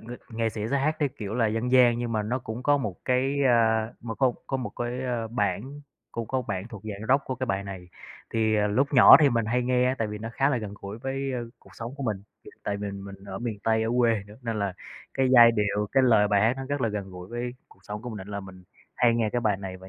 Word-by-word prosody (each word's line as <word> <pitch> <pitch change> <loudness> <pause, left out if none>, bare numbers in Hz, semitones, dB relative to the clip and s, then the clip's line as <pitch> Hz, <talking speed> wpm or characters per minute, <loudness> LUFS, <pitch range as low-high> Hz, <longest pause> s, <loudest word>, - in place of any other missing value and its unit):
ng 120 0 -11
nghệ 115 -1 +1
sĩ 110 0 -4
sẽ 140 - +2
hát 155 +3 0
cái 145 - +1
kiểu 105 -1 -4
là 115 -2 +2
dân 115 +3 -1
gian 120 -2 +6
nhưng 120 -1 -3
mà 110 -1 0
nó 120 +5 -1
cũng 120 0 -6
có 145 +2 +4
một 105 -9 -3
cái, 130 +2 +1
a, 110 -2 +3
nó 115 -1 -5
có 130 0 +2
có 135 - -1
một 130 -2 -4
cái, 120 +2 -3
a, 120 -3 -2
bản 120 +5 -2 0.3
cũng 115 -2 -4
có 130 -1 -1
bản 100 0 -4
thuộc 105 -4 -10
dạng 105 0 -6
Rock 135 +2 +3
của 130 - -3
cái 130 +1 -3
bài 100 -4 -1
này 95 -2 -8 0.4
thì, 110 -1 +1
à, 105 0 +2
lúc 130 +7 +1
nhỏ 125 - +10
thì 145 - +6
mình 115 -2 +1
hay 125 +3 +1
nghe 125 +1 +2
tại 110 - -1
vì 105 0 -5
nó 115 +2 -5
khá 135 +3 +2
là 140 - +1
gần 105 -3 -6
gũi 100 +3 -7
với, 135 +2 -3
a, 125 - -2 0.2
cuộc - - -20
sống 120 +3 -7
của 140 - -6
mình, 105 -6 -2 0.4
tại 100 - -2
vì 100 0 -4
mình 100 0 -9
ở 95 -1 -6
miền 115 -3 -4
Tây 110 0 +2
ở 110 - -1
quê 115 -4 +3
nữa 105 +1 -14
nên 115 -2 -2
là 100 -2 -1 0.4
cái 135 -1 +2
giai 120 -1 +9
điệu, 105 -1 0
cái 135 - +4
lời 110 -5 +5
bài 100 -1 +3
hát 115 +4 +3
nó 135 - -5
rất 145 0 -1
là 115 - +1
gần 100 -2 -4
gũi 90 0 -10
với 120 +2 -4 0.2
cuộc - - -21
sống 105 +1 -7
của 125 - -6
mình 110 - -6
nên 95 +1 -9
là 100 -1 -4
mình 95 -2 -12 0.3
hay 120 -2 +3
nghe 115 -2 +1
cái 120 - 0
bài 105 -4 +1
này 95 -1 -7
và 95 0 -13
115 Hz, 280 wpm, -26 LUFS, 105-125 Hz, 0.4 s, nhỏ